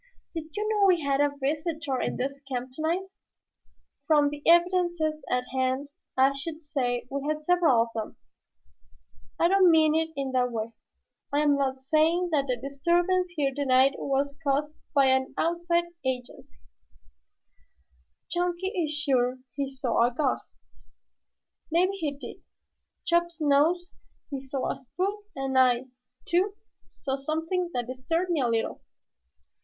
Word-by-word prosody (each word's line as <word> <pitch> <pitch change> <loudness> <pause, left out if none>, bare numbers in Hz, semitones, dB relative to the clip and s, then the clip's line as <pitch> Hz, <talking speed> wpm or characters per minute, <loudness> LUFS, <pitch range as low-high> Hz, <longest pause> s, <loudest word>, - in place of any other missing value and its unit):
"Did 325 -2 -4
you 425 0 -1
know 420 -2 +3
we 355 -3 +4
had 280 -1 +1
a 285 0 +1
visitor 300 -1 -1
in - - -2
this 275 +2 -3
camp 250 0 -3
tonight?" 325 +6 -1 1.0
"From 295 -2 +4
the 290 0 -7
evidences 345 -2 +3
at 250 0 0
hand 260 +2 -1 0.3
I 265 +1 +5
should 310 +3 -7
say 250 -5 -1
we 280 0 -2
had 305 - +1
had 305 - -18
several 330 -10 +4
of 230 - -8
them." 220 -2 -5 1.2
"I - - +5
don't 380 0 +5
mean 315 -2 +5
it 320 0 +1
in 275 -1 -2
that 250 -1 +1
way. 225 0 -4 0.6
I 290 +1 +2
am 295 -1 +4
not 265 -1 -1
saying 320 +5 +2
that 280 -3 +1
the 250 -1 0
disturbance 345 +7 +1
here 280 -3 +1
tonight 270 -1 +4
was 280 +1 -1
caused 290 +2 0 0.2
by 275 -1 +5
any 265 0 +3
outside 340 +1 +1 0.2
agency. 250 - -5 1.7
Chunky 355 +1 -1
is 355 -7 -1
sure 260 -5 +1 0.2
he 275 0 -2
saw 255 -3 +1
a - - -2
ghost. 260 +1 -2 1.1
Maybe 350 +4 +3
he 305 -4 -1
did. 280 - -9 0.7
Chops 345 -1 +1
knows 315 +5 +2 0.4
he 275 -1 -3
saw 265 0 -2
a - - -6
spook 390 +10 -3
and 270 -1 -3
I, 250 -1 +4 0.4
too, 380 +4 +1 0.5
saw 270 -1 -1
something 320 +5 -2
that 245 -1 -1
disturbed 325 +9 -2
me 320 -5 +1
a 250 - +2
little." 230 -1 -1
290 Hz, 150 wpm, -27 LUFS, 265-340 Hz, 1.7 s, I